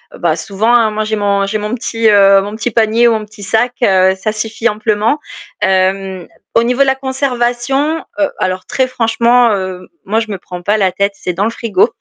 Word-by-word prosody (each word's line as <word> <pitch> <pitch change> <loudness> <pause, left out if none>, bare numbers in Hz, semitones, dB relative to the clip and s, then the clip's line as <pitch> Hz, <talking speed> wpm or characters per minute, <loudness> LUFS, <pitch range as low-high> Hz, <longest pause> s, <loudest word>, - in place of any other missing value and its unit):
heu, - - -12
bah 165 -3 +1
souvent, 200 +8 -1
hein, 225 -3 +4
moi 215 0 -2
j'ai 220 0 -2
mon 200 -1 +1
j'ai 215 +2 -1
mon 210 +2 -4
petit, 230 -2 0
heu, 195 -1 +6
mon 205 +2 -6
petit 225 +2 -2
panier 225 +2 +3
ou 235 - +3
mon 215 -1 -3
petit 210 -1 -13
sac, 230 +5 0
heu, 190 -2 +4
ça 215 +3 -2
suffit 225 +2 -2
amplement. 215 +5 0 0.4
Hem, 190 -1 0 0.3
au 230 - +4
niveau 250 +3 0
de - - +6
la 265 0 +2
conservation, 265 +2 -1 0.2
heu, 295 - +2
alors 185 0 -2
très 260 -1 0
franchement, 235 0 +2
heu, 185 -2 -5 0.2
moi 215 +3 0
je 220 - -6
me 195 - -3
prends 180 -1 -9
pas 205 +4 +1
la 190 -3 +2
tête, 200 0 0
c'est 180 - -4
dans 190 +4 -1
le 220 - +1
frigo. 230 -2 +1
215 Hz, 220 wpm, -14 LUFS, 195-240 Hz, 0.4 s, heu